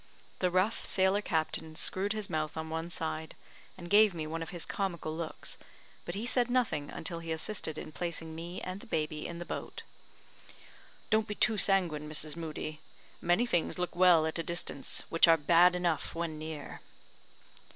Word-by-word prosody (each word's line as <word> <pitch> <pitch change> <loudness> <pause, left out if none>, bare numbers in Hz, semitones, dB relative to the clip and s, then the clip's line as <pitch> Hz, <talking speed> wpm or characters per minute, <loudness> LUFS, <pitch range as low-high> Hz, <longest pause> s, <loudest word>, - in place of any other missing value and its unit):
The 180 - +2
rough 185 +5 +1
sailor 190 +2 +3
captain 160 -3 -1
screwed 195 +5 +1
his 215 -2 -3
mouth 155 0 -2
on 160 0 -4
one 165 +1 -3
side, 160 -2 -4 0.4
and 175 -2 -8
gave 205 0 +6
me 160 -2 -3
one 165 +1 -4
of 165 - -5
his 175 -2 -4
comical 170 -5 -3
looks, 165 -1 -5 0.5
but 175 - -4
he 210 +4 -3
said 245 0 +2
nothing 235 - +1
until 170 -3 -3
he 165 -1 -6
assisted 160 -1 -2
in - - -6
placing 165 -1 -4
me 170 +2 -6
and 185 +1 -5
the - - -13
baby 155 -5 -2
in 170 - -6
the 175 - -6
boat. - - -6 1.3
"Don't 220 0 +3
be 210 - -4
too 220 - +4
sanguine, 175 -7 +2
Mrs. 155 0 -2
Moodie; 155 -2 -5 0.4
many 175 +7 +3
things 175 -8 0
look 180 -1 -2
well 175 -3 +6
at 160 +1 -2
a - - +2
distance 170 -5 -1
which 165 - +6
are 165 0 +7
bad 175 +3 +5
enough 175 -4 -1
when 165 -2 -3
near." 155 -2 -7
170 Hz, 180 wpm, -31 LUFS, 160-185 Hz, 1.3 s, are